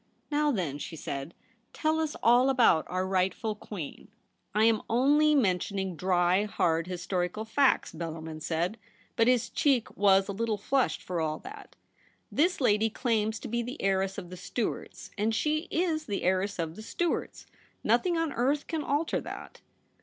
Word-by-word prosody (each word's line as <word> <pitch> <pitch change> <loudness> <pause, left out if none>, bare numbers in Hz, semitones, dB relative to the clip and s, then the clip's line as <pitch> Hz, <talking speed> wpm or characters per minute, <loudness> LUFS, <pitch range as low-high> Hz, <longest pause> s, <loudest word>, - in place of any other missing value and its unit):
' - - -40
Now 295 0 +2
then,' 165 - -2
she 165 - -6
said, 140 +1 -5 0.2
' - - -41
tell 315 0 0
us 315 -2 -1
all 245 +3 +5
about 240 -11 +4
our 185 +1 -1
rightful 190 +4 0
Queen.' 205 -6 -8 0.3
' - - -40
I 215 - +4
am 225 -1 +4
only 290 +6 +4
mentioning 190 -5 0
dry, 180 +2 +2
hard 165 -5 0
historical 180 +3 -2
facts,' 270 +5 +2
Bellarmin 160 -1 -6
said; 175 +8 -1 0.4
but 230 - +3
his 245 -1 +3
cheek 265 -6 +1
was 195 -1 +4
a - - -2
little 220 +1 -1
flushed 260 +6 0
for 175 -2 -2
all 155 -1 -1
that. 410 +1 -11 0.3
' - - -37
This 360 +3 +2
lady 220 -4 +3
claims 220 -2 0
to - - -6
be 235 +1 -1
the 250 +5 -6
heiress 195 0 0
of 175 - -7
the 185 - -7
Stuarts, 215 +5 -4
and 220 +2 +1
she 310 +6 0
is 320 -2 0
the 200 -3 -2
heiress 190 +2 +1
of 165 -2 -3
the 215 - -9
Stuarts. 340 +9 -2 0.4
Nothing 355 -3 +2
on 330 -3 -1
earth 275 +5 +1
can 320 -2 -2
alter 290 +4 0
that.' - - -9
215 Hz, 175 wpm, -29 LUFS, 180-270 Hz, 0.4 s, all